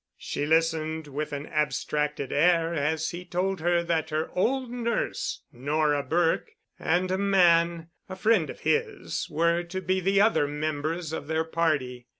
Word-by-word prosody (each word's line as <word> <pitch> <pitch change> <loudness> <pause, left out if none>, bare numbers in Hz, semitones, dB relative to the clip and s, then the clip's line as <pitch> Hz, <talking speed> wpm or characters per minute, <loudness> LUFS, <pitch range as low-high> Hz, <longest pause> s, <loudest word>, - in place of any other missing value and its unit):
She 145 - -3
listened 160 0 +1
with 150 +1 -4
an 145 0 -4
abstracted 150 -2 -1
air 165 +2 +3
as 160 +1 0
he 175 +1 -7
told 185 +2 -1
her 170 +1 +2
that 165 -2 -1
her 155 +1 -2
old 250 +6 0
nurse, 235 -1 -2
Nora 145 +3 +1
Burke, 165 +3 0 0.3
and 180 +3 +1
a 190 - 0
man, 170 -4 +3 0.2
a 185 - -5
friend 195 -3 +2
of - - -9
his, 450 -4 -1
were 170 +2 +2
to 175 +2 -5
be 185 0 0
the 195 +2 +2
other 205 -8 +4
members 155 +2 -3
of 145 - -5
their 160 +1 0
party. 150 -7 -1
165 Hz, 160 wpm, -27 LUFS, 150-180 Hz, 0.3 s, other